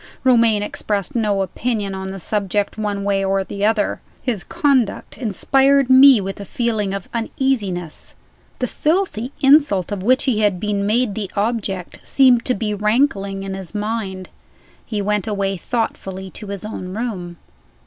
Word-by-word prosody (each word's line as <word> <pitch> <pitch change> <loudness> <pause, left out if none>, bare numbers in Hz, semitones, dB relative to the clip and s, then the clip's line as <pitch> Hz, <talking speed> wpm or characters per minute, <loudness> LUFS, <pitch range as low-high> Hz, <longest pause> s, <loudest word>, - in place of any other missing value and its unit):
Romayne 230 -5 +4
expressed 205 -1 -2
no 210 -4 +1
opinion 205 +1 -2
on 190 0 -5
the 195 - -6
subject, 205 +1 -1
one 205 -2 -2
way 195 -1 +1
or 195 0 +1
the 200 +1 -5
other. 215 -1 +1 0.2
His 235 -8 -1
conduct 275 - 0
inspired 270 +4 +2
me 260 -2 +8
with 195 0 -5
a - - -5
feeling 220 -2 -1
of 195 -2 -5
uneasiness. 225 - -2 0.4
The 255 - -1
filthy 300 - -1
insult 270 - +4
of 205 -2 -3
which 255 +6 +3
he 245 -6 +1
had 205 -4 +2
been 205 0 -1
made 230 0 +1
the 200 -2 -4
object 200 -4 -2
seemed 255 -3 +4
to 250 - +1
be 210 0 -2
rankling 205 -2 0
in 195 0 -4
his 190 +1 -7
mind. 205 -3 -3 0.5
He 210 -3 -3
went 210 +1 0
away 200 -2 -1
thoughtfully 190 -3 -4
to 210 - -9
his 200 +1 -5
own 185 -3 -6
room. 190 -7 -4
210 Hz, 160 wpm, -20 LUFS, 195-240 Hz, 0.5 s, me